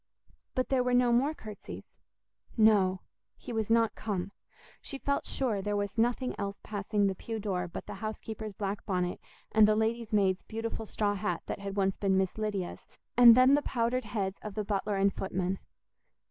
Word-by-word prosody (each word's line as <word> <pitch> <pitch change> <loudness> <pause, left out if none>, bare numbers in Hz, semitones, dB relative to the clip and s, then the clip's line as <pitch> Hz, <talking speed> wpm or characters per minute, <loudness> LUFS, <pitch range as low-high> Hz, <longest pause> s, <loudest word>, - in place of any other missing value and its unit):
But 255 - 0
there 265 -2 +3
were 250 0 +2
no 245 -1 +4
more 275 +6 +2
curtsies—no, 210 -2 -1 0.4
he - - -8
was 220 -1 -1
not 230 -1 +3
come; 200 -3 -3 0.5
she 275 - -6
felt 280 +1 -1
sure 230 -7 -1
there 205 +1 -1
was 200 -1 -2
nothing 240 +3 +1
else 200 0 -3
passing 205 0 -1
the 195 - +2
pew 225 +4 -5
door 185 -4 -2
but 170 - -7
the - - -7
house 215 0 -3
keeper's 215 -2 -7
black 200 0 -3
bonnet 180 -2 -1 0.3
and 215 -1 +6
the 215 - +4
lady's 225 +1 -1
maid's 195 -3 +2
beautiful 225 0 -5
straw 205 -1 0
hat 180 -3 -2
that - - -4
had 200 0 -5
once 195 -1 +1
been 195 -2 +2
Miss 190 +2 0
Lydia's, 205 -4 -3 0.3
and 235 -1 +9
then 255 +2 +7
the 290 - +4
powdered 245 -1 -1
heads 200 -3 -3
of 210 -2 -7
the 210 - -2
butler 205 0 -1
and 195 0 +2
footman. 190 0 -2
210 Hz, 185 wpm, -30 LUFS, 195-230 Hz, 0.5 s, and